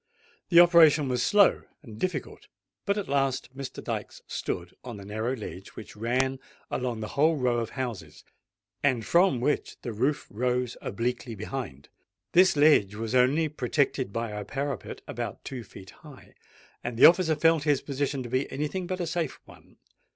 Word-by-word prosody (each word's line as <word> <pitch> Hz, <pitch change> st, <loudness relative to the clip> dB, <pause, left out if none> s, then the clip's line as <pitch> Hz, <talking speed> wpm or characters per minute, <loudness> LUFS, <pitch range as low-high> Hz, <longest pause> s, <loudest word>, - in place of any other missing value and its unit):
The 170 Hz, -, +7 dB
operation 165 Hz, -5 st, +6 dB
was 125 Hz, -1 st, 0 dB
slow 205 Hz, +6 st, +4 dB, 0.2 s
and 110 Hz, -5 st, -11 dB
difficult; 180 Hz, -7 st, -4 dB, 0.4 s
but 200 Hz, +1 st, +1 dB
at 205 Hz, -, -3 dB
last 135 Hz, -2 st, -1 dB
Mr. 135 Hz, -1 st, -7 dB
Dykes -, -, -5 dB
stood 85 Hz, 0 st, -4 dB
on 120 Hz, -5 st, -8 dB
a 100 Hz, -, -10 dB
narrow 110 Hz, +5 st, -2 dB
ledge 100 Hz, -4 st, -8 dB
which 110 Hz, -, -10 dB
ran 130 Hz, +4 st, 0 dB, 0.3 s
along 125 Hz, -3 st, -2 dB
the 110 Hz, -, -5 dB
whole 155 Hz, +4 st, +3 dB
row 125 Hz, -4 st, +1 dB
of 115 Hz, -, -3 dB
houses, 125 Hz, -6 st, -6 dB, 0.6 s
and 125 Hz, -6 st, +1 dB
from 170 Hz, -7 st, +3 dB
which 145 Hz, +5 st, -1 dB
the 120 Hz, -, -4 dB
roof 135 Hz, +8 st, 0 dB
rose 125 Hz, +2 st, -1 dB
obliquely 120 Hz, +2 st, -3 dB
behind. 105 Hz, -, -6 dB, 0.4 s
This 185 Hz, 0 st, +5 dB
ledge 145 Hz, -10 st, +4 dB
was 110 Hz, +1 st, -4 dB
only 130 Hz, +6 st, +3 dB
protected 140 Hz, -4 st, -1 dB
by 115 Hz, +1 st, -3 dB
a 105 Hz, 0 st, -5 dB
parapet 140 Hz, -1 st, -5 dB
about -, -, -6 dB
two 125 Hz, -3 st, -6 dB
feet 95 Hz, -2 st, -13 dB
high; 150 Hz, -4 st, -15 dB, 0.5 s
and 120 Hz, -1 st, -4 dB
the -, -, +8 dB
officer 170 Hz, -2 st, +6 dB
felt 165 Hz, +1 st, +3 dB
his 145 Hz, -2 st, +1 dB
position 140 Hz, -1 st, -2 dB
to 120 Hz, -, -7 dB
be 130 Hz, +3 st, -1 dB
any 150 Hz, +3 st, -2 dB
thing 185 Hz, +3 st, -4 dB
but 185 Hz, 0 st, -3 dB
a -, -, -1 dB
safe 165 Hz, -2 st, -3 dB
one. -, -, -18 dB
130 Hz, 175 wpm, -27 LUFS, 115-150 Hz, 0.6 s, the